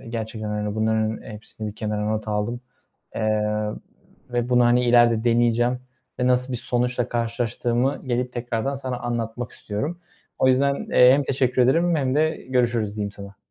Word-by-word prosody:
Eee, -, -, -12 dB
gerçekten, 110 Hz, -1 st, -4 dB
hani, 105 Hz, 0 st, -2 dB
bunların 110 Hz, 0 st, 0 dB
hepsini 110 Hz, 0 st, -8 dB
bir 105 Hz, -, -8 dB
kenara 105 Hz, -1 st, -2 dB
not 110 Hz, 0 st, -2 dB
aldım. 105 Hz, +3 st, -2 dB, 0.5 s
Eee, 110 Hz, -1 st, +1 dB, 0.9 s
ve 120 Hz, 0 st, 0 dB
bunu, 125 Hz, -1 st, +4 dB
hani, 120 Hz, +1 st, +4 dB
ileride 120 Hz, -1 st, +4 dB
deneyeceğim 120 Hz, +1 st, +2 dB, 0.4 s
ve 125 Hz, -, +2 dB
nasıl 125 Hz, +1 st, +1 dB
bir 125 Hz, -, -2 dB
sonuçla 125 Hz, 0 st, -1 dB
karşılaştığımı 120 Hz, +2 st, -1 dB
gelip 125 Hz, 0 st, -1 dB
tekrardan 120 Hz, +2 st, -2 dB
sana 130 Hz, -2 st, -4 dB
anlatmak 120 Hz, 0 st, -3 dB
istiyorum. 145 Hz, +12 st, -4 dB, 0.4 s
O 130 Hz, -, +4 dB
yüzden, 140 Hz, +2 st, +3 dB, 0.2 s
eee, 125 Hz, +1 st, +7 dB
hem 140 Hz, 0 st, +2 dB
teşekkür 130 Hz, -1 st, +1 dB
ederim 165 Hz, +6 st, +3 dB
hem 130 Hz, -3 st, 0 dB
de 155 Hz, +2 st, +3 dB, 0.2 s
görüşürüz 120 Hz, -4 st, 0 dB
diyeyim 100 Hz, -1 st, -3 dB
sana. 100 Hz, 0 st, -11 dB
120 Hz, 160 wpm, -23 LUFS, 110-125 Hz, 0.9 s, eee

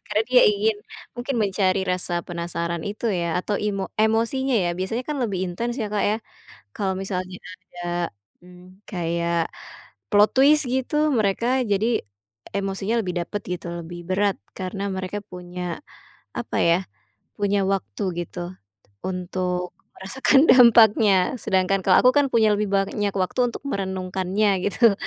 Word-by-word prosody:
karena 215 Hz, -, +1 dB
dia 250 Hz, -1 st, +7 dB
ingin, 210 Hz, +1 st, +1 dB, 0.4 s
mungkin 245 Hz, +2 st, -3 dB
mencari 195 Hz, -1 st, +1 dB
rasa 175 Hz, -1 st, -1 dB
penasaran 170 Hz, -1 st, -3 dB
itu, 210 Hz, +3 st, -7 dB
ya, 170 Hz, -3 st, -1 dB
atau 205 Hz, +2 st, -2 dB
imo 200 Hz, -2 st, -2 dB
emosinya, 230 Hz, +5 st, +2 dB
ya. 175 Hz, -, +1 dB
Biasanya, 225 Hz, +7 st, -2 dB
kan, 300 Hz, -, -2 dB
lebih 205 Hz, -6 st, -1 dB
intens, 230 Hz, +7 st, -3 dB
ya, 220 Hz, -, -1 dB
Kak, 210 Hz, -, 0 dB
ya, 210 Hz, -, +1 dB, 0.6 s
kalau 190 Hz, -2 st, -1 dB
misalnya 185 Hz, -1 st, -4 dB
ada, 185 Hz, 0 st, -11 dB, 0.6 s
m 180 Hz, +1 st, -16 dB
kayak 170 Hz, -2 st, -1 dB, 0.6 s
plot 210 Hz, 0 st, +5 dB
twist, 285 Hz, +2 st, +5 dB
gitu, 275 Hz, +4 st, 0 dB
mereka 215 Hz, 0 st, +1 dB, 0.2 s
jadi 220 Hz, +1 st, +1 dB, 0.5 s
emosinya 195 Hz, +2 st, -2 dB
lebih 180 Hz, -3 st, -4 dB
dapat, 205 Hz, +4 st, -5 dB, 0.2 s
gitu, 175 Hz, -, -11 dB, 0.2 s
lebih 175 Hz, +1 st, -8 dB
berat, 195 Hz, +1 st, +1 dB, 0.2 s
karena 195 Hz, +1 st, -4 dB
mereka 190 Hz, +1 st, -4 dB
punya, 180 Hz, -2 st, -8 dB, 0.7 s
apa, -, -, -4 dB
ya, 170 Hz, +1 st, +4 dB, 0.6 s
punya 205 Hz, -1 st, +1 dB
waktu, 195 Hz, +2 st, -2 dB, 0.2 s
gitu, 175 Hz, -, -9 dB, 0.7 s
untuk 180 Hz, -1 st, -3 dB, 0.3 s
merasakan 265 Hz, +9 st, +3 dB
dampaknya. 225 Hz, -4 st, +7 dB, 0.3 s
Sedangkan, 190 Hz, +1 st, +1 dB
kalau 185 Hz, -, +6 dB
aku, 250 Hz, -, +7 dB
kan, 285 Hz, -, +5 dB
punya 220 Hz, -2 st, +4 dB
lebih 205 Hz, 0 st, -1 dB
banyak 200 Hz, +1 st, 0 dB
waktu 185 Hz, +4 st, -1 dB
untuk 235 Hz, -, -9 dB
merenungkannya, 190 Hz, +1 st, -1 dB, 0.2 s
gitu, 220 Hz, +2 st, +4 dB
195 Hz, 140 wpm, -23 LUFS, 185-220 Hz, 0.7 s, dia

